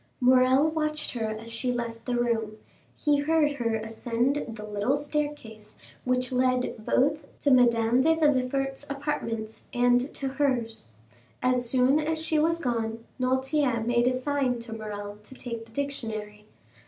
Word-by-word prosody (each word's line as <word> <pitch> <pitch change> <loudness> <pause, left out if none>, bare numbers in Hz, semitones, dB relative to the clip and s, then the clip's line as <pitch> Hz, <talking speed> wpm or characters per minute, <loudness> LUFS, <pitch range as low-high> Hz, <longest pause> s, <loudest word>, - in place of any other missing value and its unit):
40274m - - +2
Morrel 260 +4 +5
watched 305 -1 -1
her 225 -3 -2
as 215 +1 -6
she 250 +2 -1
left 235 -2 -4
the 250 - -1
room; 225 -3 0 0.4
he 295 -2 +2
heard 300 0 +2
her 235 -5 -1
ascend 230 +5 -1
the 210 - -8
little 210 +6 0
staircase 290 -8 -4 0.3
which 250 0 0
led 255 0 +1
both 290 +6 +1
to 285 - +2
Madame 240 -1 +4
de 320 +4 +4
Villefort's 270 -3 +1
apartments 230 -6 -4
and 245 +2 +3
to 275 - -4
hers. 260 - -1 0.6
As 250 -1 +2
soon 260 +3 +4
as 315 +1 -1
she 315 -1 +1
was 330 +2 +2
gone, 230 -5 -2 0.2
Noirtier 260 -2 +1
made 240 +1 +2
a 255 - +3
sign 260 -1 0
to 230 -1 -8
Morrel 205 -1 -6
to 260 - -11
take 235 -3 -6
the - - -20
dictionary. 220 -6 -4
250 Hz, 155 wpm, -27 LUFS, 230-280 Hz, 0.6 s, Morrel